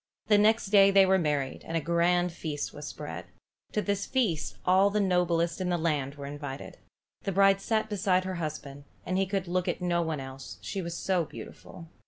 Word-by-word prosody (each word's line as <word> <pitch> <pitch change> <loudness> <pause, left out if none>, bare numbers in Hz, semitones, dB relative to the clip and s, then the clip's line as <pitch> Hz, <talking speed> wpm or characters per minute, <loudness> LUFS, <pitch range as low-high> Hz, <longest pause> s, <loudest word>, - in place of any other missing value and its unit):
The 210 -1 +6
next 215 -1 +3
day 200 -2 +7
they 195 -1 +6
were 190 0 +3
married, 145 -5 -1
and 165 - -2
a - - +2
grand 170 +2 +2
feast 155 -3 -4
was - - -8
spread. - - -7 0.5
To 210 - 0
this 200 0 -1
feast 215 - -1
all 190 +2 +5
the 210 +1 0
noblest 175 -3 +1
in 180 - -1
the 175 - +1
land 150 -4 -1
were 140 -1 -8
invited. 145 -1 -7 0.4
The 195 - -2
bride 195 +1 +4
sat 220 +1 0
beside 190 -3 +1
her 185 -1 -4
husband, 145 -2 -6 0.2
and 185 - -2
he 190 0 +1
could 190 -1 -2
look 180 +1 -1
at - - -1
no 175 -1 +1
one 160 -3 -2
else, 135 0 -8
she 195 - -3
was 170 -1 -5
so 185 -3 +1
beautiful. 165 +2 -11
180 Hz, 205 wpm, -28 LUFS, 160-195 Hz, 0.5 s, day